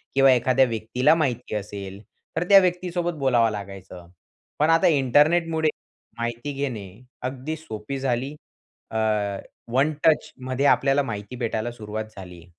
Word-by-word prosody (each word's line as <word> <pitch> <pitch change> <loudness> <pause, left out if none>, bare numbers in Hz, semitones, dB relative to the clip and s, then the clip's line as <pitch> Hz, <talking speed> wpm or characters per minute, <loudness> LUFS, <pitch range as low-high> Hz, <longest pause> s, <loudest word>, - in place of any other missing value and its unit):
किंवा 135 -1 +6
एखाद्या 130 +2 +3
व्यक्तीला 120 +6 +2
माहिती 125 -8 -1
असेल, 100 -1 -6 0.4
तर 170 - +2
त्या 195 -1 +10
व्यक्तीसोबत 175 -1 -1
बोलावं 120 -5 +3
लागायचं. 95 -3 -8 0.5
पण 150 - +3
आता 165 0 +5
इंटरनेटमुळे 160 +3 +3 0.5
माहिती 120 +5 -3
घेणे 125 -8 -4 0.3
अगदी 130 +4 -4
सोपी 135 -2 -6
झाली. 130 +2 -1 0.6
अ, 110 - -2 0.8
1 145 +4 +3
टचमध्ये 135 -3 +1
आपल्याला 140 0 +4
माहिती 105 0 -6
भेटायला 120 -1 -2
सुरुवात 110 -1 -6
झाली 90 -3 -10
130 Hz, 125 wpm, -24 LUFS, 110-150 Hz, 0.8 s, त्या